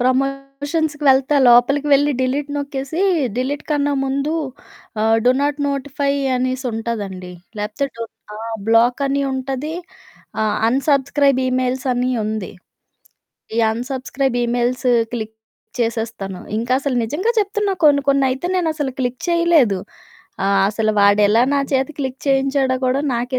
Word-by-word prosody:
ప్రమోషన్స్‌కి 275 Hz, +4 st, -1 dB
వెళ్తే, 270 Hz, +2 st, +4 dB
లోపలికి 275 Hz, +5 st, +4 dB
వెళ్లి 290 Hz, +1 st, +4 dB
డిలీట్ 275 Hz, +3 st, -1 dB
నొక్కేసీ 280 Hz, +3 st, -4 dB, 0.4 s
డిలీట్‌కన్నా 285 Hz, +2 st, -1 dB
ముందు 275 Hz, +3 st, -1 dB, 0.7 s
ఆహ్, 225 Hz, +1 st, +3 dB
డు 250 Hz, -, +6 dB
నాట్ 290 Hz, +1 st, 0 dB
నోటిఫై 280 Hz, 0 st, -1 dB, 0.2 s
అనేసుంటాదండి. 225 Hz, -7 st, -3 dB, 0.3 s
లేపోతే 210 Hz, +6 st, -2 dB
డున్ 230 Hz, -1 st, -7 dB, 0.2 s
ఆ! -, -, -8 dB, 0.3 s
బ్లాకని 250 Hz, +5 st, +2 dB
ఉంటది. 265 Hz, +4 st, -3 dB, 0.7 s
ఆ! -, -, +2 dB, 0.3 s
అన్‌సబ్‌స్క్రై‌బ్ 275 Hz, +1 st, +2 dB
ఇమెయిల్సని 255 Hz, 0 st, 0 dB
ఉంది. 215 Hz, -3 st, -4 dB, 1.0 s
ఈ -, -, +1 dB
అన్‌సబ్‌స్క్రై‌బ్ 260 Hz, +1 st, -2 dB
ఈమెయిల్స్ 245 Hz, +2 st, -1 dB, 0.3 s
క్లిక్ 220 Hz, -2 st, -5 dB, 0.4 s
చేసేస్తాను. 225 Hz, -5 st, -3 dB, 0.2 s
ఇంకసలు 255 Hz, +3 st, 0 dB
నిజంగా 315 Hz, -, -1 dB
చెప్తున్నా, 410 Hz, 0 st, -1 dB
కొన్ని 285 Hz, -2 st, +5 dB
కొన్నయితే 270 Hz, +2 st, +2 dB
నేనసలు 310 Hz, -6 st, -1 dB
క్లిక్ 250 Hz, 0 st, -2 dB
చేయలేదు. 335 Hz, -, +3 dB, 0.7 s
ఆహ్, 195 Hz, 0 st, +3 dB
అసలు 215 Hz, +1 st, 0 dB
వాడెలా 205 Hz, +2 st, +5 dB
నా 280 Hz, -, +2 dB
చేత 265 Hz, +1 st, +1 dB
క్లిక్ 265 Hz, -2 st, -4 dB
చేయించాడో 270 Hz, -1 st, +2 dB
గూడా 255 Hz, +2 st, +1 dB
నాకే 245 Hz, +2 st, -1 dB
265 Hz, 115 wpm, -19 LUFS, 240-280 Hz, 1.0 s, డు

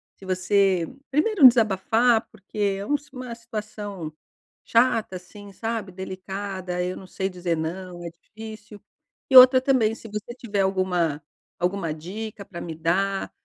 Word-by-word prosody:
se 195 Hz, -, -14 dB
você, 185 Hz, -1 st, +2 dB, 0.2 s
primeiro 305 Hz, +1 st, +6 dB
desabafar 225 Hz, +1 st, +3 dB
porque 210 Hz, -1 st, -15 dB, 0.2 s
é -, -, -4 dB
uma 290 Hz, +5 st, +1 dB, 0.2 s
uma 255 Hz, -3 st, -7 dB
situação 210 Hz, -7 st, -6 dB, 0.5 s
chata, 230 Hz, -5 st, +2 dB
assim, 200 Hz, +3 st, -13 dB
sabe, 225 Hz, -2 st, -4 dB
delicada, 190 Hz, -1 st, -5 dB
eu 180 Hz, +1 st, -3 dB
não 190 Hz, -, -10 dB
sei 190 Hz, +1 st, -3 dB
dizer 180 Hz, -2 st, -2 dB
não, 175 Hz, +2 st, -5 dB
é 170 Hz, -, -5 dB
difícil. 210 Hz, +4 st, -12 dB, 0.5 s
E 265 Hz, -, +8 dB
outra 255 Hz, 0 st, +10 dB
também 255 Hz, -5 st, +2 dB
se 225 Hz, -, -10 dB
você 210 Hz, +2 st, -6 dB
tiver 210 Hz, -5 st, -2 dB
alguma 180 Hz, -6 st, 0 dB, 0.4 s
alguma 180 Hz, -3 st, -1 dB
dica 200 Hz, +7 st, -7 dB
pra 185 Hz, -4 st, -9 dB
me 165 Hz, -, -6 dB
dar, 190 Hz, +5 st, 0 dB
195 Hz, 145 wpm, -24 LUFS, 180-225 Hz, 0.5 s, outra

